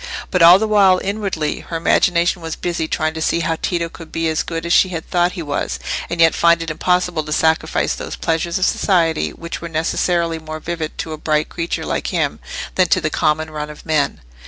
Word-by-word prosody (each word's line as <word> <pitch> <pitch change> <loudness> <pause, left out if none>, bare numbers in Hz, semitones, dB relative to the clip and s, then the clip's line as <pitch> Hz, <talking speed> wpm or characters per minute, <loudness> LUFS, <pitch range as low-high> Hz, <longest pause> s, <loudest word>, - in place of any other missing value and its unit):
But 180 - +1
all 170 +2 +9
the 220 +2 -1
while 195 -3 +5
inwardly 195 -6 -2
her 165 - -5
imagination 170 +1 +2
was 165 -1 -4
busy 170 -2 -2
trying 155 0 -1
to 160 - -5
see 170 - +1
how 165 0 -1
Tito 170 -1 -1
could 165 -1 -12
be 165 0 -1
as 160 - 0
good 165 0 -4
as 170 - +1
she 185 - +5
had 165 -3 -5
thought 175 0 +1
he 175 - -5
was, 145 -1 -2 0.3
and 170 - -4
yet 165 -1 +6
find 170 0 +3
it 165 - -4
impossible 180 +1 0
to 150 - -8
sacrifice 160 +1 +1
those - - -6
pleasures 165 +1 -1
of 185 - +2
society 165 -7 +1
which 170 0 -7
were 170 - -6
necessarily 165 +1 0
more 155 0 -7
vivid 160 -1 -5
to 160 - -4
a 155 - -7
bright 155 0 0
creature 170 -1 -3
like - - -2
him - - -1 0.3
than - - +3
to - - +3
the - - -2
common 155 +1 0
run 150 -1 -5
of 150 - -12
men. 155 -3 0
165 Hz, 220 wpm, -19 LUFS, 160-175 Hz, 0.3 s, all